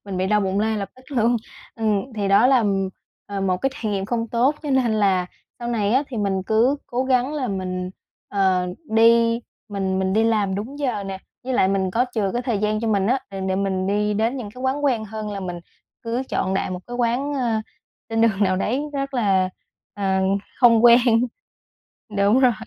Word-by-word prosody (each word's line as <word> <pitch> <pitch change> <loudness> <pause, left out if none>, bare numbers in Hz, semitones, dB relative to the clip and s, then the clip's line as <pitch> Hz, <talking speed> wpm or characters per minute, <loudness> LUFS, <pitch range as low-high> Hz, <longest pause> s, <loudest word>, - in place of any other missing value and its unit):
mình 200 -2 -5
bị 185 +1 0
đau 210 +1 +3
bụng 195 0 0
lay 220 0 0
lập 200 -2 -3
tức 255 - -18
luôn. 235 +1 +3 0.4
Ừm, 220 +2 -1
thì 200 -2 -1
đó 200 +5 +5
là, 260 -1 +5
ừm, 195 -3 +1 0.4
ờ, 200 -1 -4
một 190 -1 +1
cái 270 +9 -1
trải 220 -7 -3
nghiệm 195 -1 -1
không 230 +2 -2
tốt 245 +6 +2
cho 295 - -3
nên 255 -4 +2
là 195 -4 +2 0.3
sau 240 - -5
này 215 -3 0
á, 260 +3 +4
thì 250 - -6
mình 195 -3 0
cứ 235 +6 +3
cố 250 +2 -1
gắng 260 +2 +1
là 260 -5 -2
mình, 185 -1 -3 0.4
ờ, 190 -2 +1 0.2
đi 230 +1 +4 0.3
mình 195 -2 -1
mình 190 0 0
đi 220 +2 +3
làm 210 -4 +1
đúng 230 +9 -5
giờ 245 -8 -1
nè, 195 -1 -5 0.3
với 260 - -2
lại 190 -6 +3
mình 190 -1 0
có 235 +6 +2
chừa 205 -4 0
cái 245 - -1
thời 240 -5 -1
gian 215 +1 0
cho 230 - -1
mình 200 -3 +2
á, 255 +5 +2
để 195 -1 -6
để 190 0 -1
mình 190 -1 -1
đi 210 +1 +1
đến 225 +5 0
những 220 -5 -6
cái 250 - -10
quán 275 +3 -1
quen 240 -6 +1
hơn 215 0 -6
là 200 -1 -5
mình 175 -2 -5 0.4
cứ 235 +2 -2
chọn 190 - -1
đại 190 - -1
một 180 - -4
cái 245 0 -6
quán, 250 +4 0
ơ, 235 -5 0 0.5
trên 225 0 0
đường 215 -3 +3
nào 185 -2 +2
đấy 230 +8 0
rất 275 -1 -3
là, 195 -6 +2 0.4
à, 190 -2 0 0.4
hông 235 -1 +6
quen. 235 0 +9 1.2
Đúng 200 +5 +4
rồi. 255 -2 +5
215 Hz, 220 wpm, -22 LUFS, 195-240 Hz, 1.2 s, quen